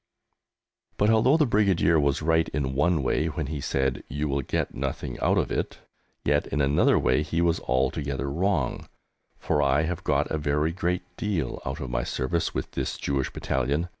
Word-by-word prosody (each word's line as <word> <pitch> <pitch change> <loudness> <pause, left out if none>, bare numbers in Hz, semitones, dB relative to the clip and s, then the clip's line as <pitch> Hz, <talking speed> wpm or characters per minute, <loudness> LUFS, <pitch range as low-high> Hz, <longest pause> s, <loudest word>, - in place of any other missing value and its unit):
But 105 +2 +3
although 120 +7 +4
the 155 - +4
Brigadier 95 - +3
was 70 +1 +1
right 80 0 +2
in 65 -3 -2
one 75 +2 +2
way 80 +4 +1
when 80 -1 -3
he 70 0 -4
said 65 0 -1
"You 75 +3 -2
will 70 0 0
get - - -2
nothing - - -4
out - - +2
of - - 0
it," - - -2 0.5
yet 75 +1 +2
in 75 - -2
another 70 +1 +3
way 65 +3 +2
he 80 +2 -2
was 85 -1 +2
altogether 70 +1 -1
wrong, 85 +5 -1 0.5
for 75 - 0
I 75 +1 +3
have 85 +1 -3
got 75 0 +1
a 80 - 0
very 75 +2 +1
great 90 +1 -1
deal 100 - -2
out 70 +4 -3
of 65 -5 -5
my - - 0
service 80 +8 -1
with - - -4
this - - -3
Jewish 70 -1 -1
Battalion. 70 +6 -1
75 Hz, 185 wpm, -26 LUFS, 70-85 Hz, 0.5 s, although